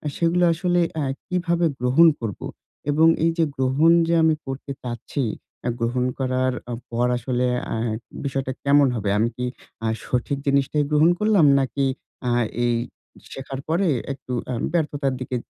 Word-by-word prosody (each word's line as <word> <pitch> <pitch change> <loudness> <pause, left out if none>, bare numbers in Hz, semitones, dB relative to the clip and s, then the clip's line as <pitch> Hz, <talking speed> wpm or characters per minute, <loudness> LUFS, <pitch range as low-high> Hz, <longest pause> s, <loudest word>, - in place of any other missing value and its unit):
সেগুলো 170 +1 +2
আসলে 175 +1 +1 0.2
আ - - 0 0.2
কিভাবে 175 -1 0
গ্রহণ 130 +7 +5
করব? 110 -5 -4 0.5
এবং 160 +3 +5 0.2
এইযে 165 0 +2
গ্রহণ 135 +5 +3 0.2
যে, 170 - +1
আমি 160 -1 +4
করতে 135 +1 -6
চাচ্ছি, 120 +3 -4 0.4
এ - - +2
গ্রহণ 125 +2 0
করার 130 0 0 0.2
আ - - -2 0.2
পর 120 +1 +1
আসলে, 125 +1 -1 0.3
আহে 115 0 -1 0.3
বিষয়টা 135 -1 -2
কেমন 140 0 +5
হবে? 105 -3 -2
আমি 115 +2 +2
কি 125 - -2 0.4
আ - - +1 0.2
সঠিক 125 +3 -1
জিনিসটাই 140 +2 +2
গ্রহণ 150 +3 +5
করলাম, 210 -7 +4
নাকি 135 +1 0 0.4
আ - - +1 0.3
এই 120 - +2 0.6
শেখার 135 0 -6
পরে, 175 +4 +1 0.3
একটু 130 - -11 0.2
অ্যাম 125 -2 -3
ব্যর্থতার 145 -5 0
দিকে 130 0 -4
135 Hz, 150 wpm, -23 LUFS, 125-160 Hz, 0.6 s, গ্রহণ